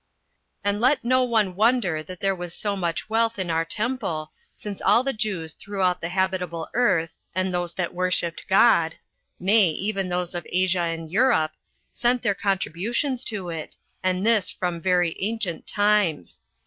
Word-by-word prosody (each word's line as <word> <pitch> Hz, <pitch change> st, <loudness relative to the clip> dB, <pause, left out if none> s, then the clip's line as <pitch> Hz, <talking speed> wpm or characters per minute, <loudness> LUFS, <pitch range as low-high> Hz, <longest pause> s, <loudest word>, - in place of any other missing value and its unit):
2. 205 Hz, -, +1 dB
And 205 Hz, +1 st, -4 dB
let 255 Hz, +1 st, +3 dB
no 255 Hz, +1 st, +4 dB
one 220 Hz, -7 st, +1 dB
wonder 210 Hz, -7 st, +2 dB
that 180 Hz, +3 st, -10 dB
there 195 Hz, 0 st, +2 dB
was 175 Hz, -2 st, -6 dB
so 205 Hz, -2 st, -2 dB
much 170 Hz, -4 st, -2 dB
wealth 225 Hz, +1 st, +1 dB
in 185 Hz, -3 st, -2 dB
our 165 Hz, 0 st, +1 dB
temple, 170 Hz, -6 st, -2 dB, 0.2 s
since 205 Hz, -2 st, -7 dB
all 210 Hz, +5 st, +4 dB
the 270 Hz, 0 st, -1 dB
Jews 195 Hz, -7 st, -2 dB
throughout 190 Hz, -3 st, -1 dB
the 165 Hz, -, -3 dB
habitable 180 Hz, -3 st, -1 dB
earth, 180 Hz, -10 st, +1 dB, 0.2 s
and 185 Hz, 0 st, 0 dB
those 175 Hz, -1 st, -2 dB
that 180 Hz, -1 st, -2 dB
worshipped 180 Hz, -2 st, -1 dB
God, 190 Hz, -5 st, +4 dB, 0.4 s
nay, 200 Hz, 0 st, +4 dB
even 195 Hz, +3 st, -2 dB
those 180 Hz, 0 st, -2 dB
of 175 Hz, -2 st, -5 dB
Asia 185 Hz, 0 st, +2 dB
and 165 Hz, -1 st, -5 dB
Europe, 185 Hz, -8 st, +3 dB, 0.4 s
sent 245 Hz, 0 st, +1 dB
their 200 Hz, -, +2 dB
contributions 205 Hz, -, -1 dB
to 195 Hz, -5 st, -2 dB
it, 160 Hz, -2 st, -6 dB, 0.2 s
and 185 Hz, +1 st, 0 dB
this 220 Hz, -5 st, +3 dB
from 175 Hz, -2 st, -3 dB
very 180 Hz, -2 st, +2 dB
ancient 210 Hz, -4 st, -2 dB
times. 205 Hz, -, +1 dB
185 Hz, 165 wpm, -24 LUFS, 175-215 Hz, 0.4 s, no